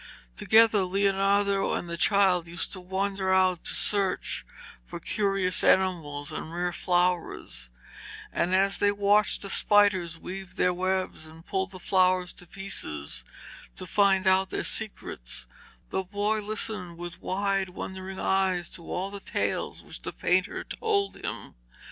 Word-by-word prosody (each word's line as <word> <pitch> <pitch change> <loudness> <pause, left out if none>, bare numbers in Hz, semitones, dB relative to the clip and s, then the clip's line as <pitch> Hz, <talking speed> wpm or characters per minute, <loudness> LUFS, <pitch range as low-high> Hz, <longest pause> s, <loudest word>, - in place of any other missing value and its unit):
Together 220 - +5
Leonardo 195 +1 +2
and - - -3
the 170 - -4
child 185 -2 +3
used 170 0 -3
to 190 - -4
wander 190 +1 -1
out 185 -2 +3
to - - -1
search 200 -2 +1 0.4
for - - -8
curious 195 -4 +1
animals 155 -7 +2
and 160 - -5
rare 175 0 -1
flowers, 175 - -1 0.6
and 180 +2 +1
as 195 +1 +2
they 205 - +4
watched 205 +1 +3
the 200 - -5
spiders 190 -5 +3
weave 185 +1 -8
their 180 -2 +2
webs 185 -3 -2
and 160 +2 -13
pulled 190 -2 -1
the 190 - -9
flowers 185 -1 +2
to 175 - -12
pieces 75 - -3 0.5
to 185 - -7
find 195 +1 +3
out 190 0 +4
their - - -2
secrets, 195 - -2 0.5
the 190 - 0
boy 205 +3 -1
listened 205 -4 -3
with 175 0 -8
wide 195 0 0
wondering 190 +1 -7
eyes 190 -2 +1
to - - -5
all 190 +2 -3
the 200 - -6
tales - - -2
which - - -8
the - - -5
painter - - 0
told 405 -3 -1
him. - - -5
190 Hz, 145 wpm, -27 LUFS, 180-200 Hz, 0.6 s, Together